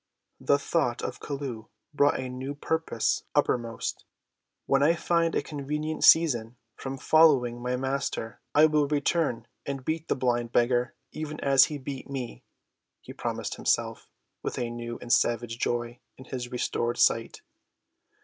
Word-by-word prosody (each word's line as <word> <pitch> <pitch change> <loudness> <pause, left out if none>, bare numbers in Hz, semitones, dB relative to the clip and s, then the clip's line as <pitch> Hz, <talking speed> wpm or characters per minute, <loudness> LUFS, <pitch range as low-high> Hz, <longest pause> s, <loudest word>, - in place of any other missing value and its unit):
The 140 - +3
thought 140 -4 -1
of - - -4
Chelluh 135 -6 -5 0.3
brought 145 0 +3
a 130 - -3
new 130 +3 -5
purpose 160 -5 0
uppermost. 115 -2 0 0.6
"When 135 0 +2
I 160 +4 +4
find 170 0 +1
a - - +1
convenient 150 +2 -3
season 125 -8 +5 0.2
from 135 0 -6
following 130 -6 +4
my 125 +1 -1
Master 130 -3 -3
I 150 +1 +8
will 150 -2 +3
return 150 -2 0 0.2
and 135 -2 -5
beat 160 0 -2
the - - +1
blind 120 -3 0
beggar 120 0 +2 0.2
even 155 -1 -5
as 135 -1 +6
he 150 - -5
beat 135 0 -7
me," 125 - -5 0.6
he - - -11
promised - - -4
himself, - - -1 0.3
with - - -4
a 120 -1 -2
new 120 0 -5
and 120 - +1
savage 115 0 +1
joy 120 0 -2 0.2
in 130 - -12
his 125 -2 -5
restored 120 -1 -1
sight. - - +2
135 Hz, 150 wpm, -27 LUFS, 120-150 Hz, 0.6 s, I